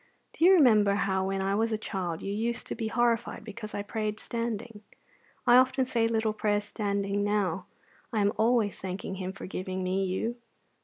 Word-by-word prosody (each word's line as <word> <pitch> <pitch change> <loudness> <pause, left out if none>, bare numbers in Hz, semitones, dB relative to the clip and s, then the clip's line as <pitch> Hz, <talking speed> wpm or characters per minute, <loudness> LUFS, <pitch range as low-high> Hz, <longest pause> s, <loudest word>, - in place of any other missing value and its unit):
Do 330 - +2
you 380 - +8
remember 215 - +5
how, 190 -1 0
when 195 0 -1
I 195 +1 0
was 225 +2 +1
a 220 - +1
child, 185 -6 -4
you 200 - -2
used 230 +3 -2
to - - -4
be 225 - -3
horrified 235 -1 0
because 215 0 -8
I 205 - -2
prayed 215 0 -3
standing? 230 -2 -4 0.6
I 240 - +7
often 260 +1 +4
say 235 -3 +1
little 220 -1 0
prayers 210 -1 0
standing 200 -1 -1
now; 195 -4 0 0.4
I 220 -3 +1
am 205 +1 +2
always 225 -2 +2
thanking 190 +1 -4
Him 185 0 -3
for 195 - -9
giving 185 0 -4
me 190 +1 0
you. 225 +6 -2
210 Hz, 190 wpm, -29 LUFS, 195-230 Hz, 0.6 s, you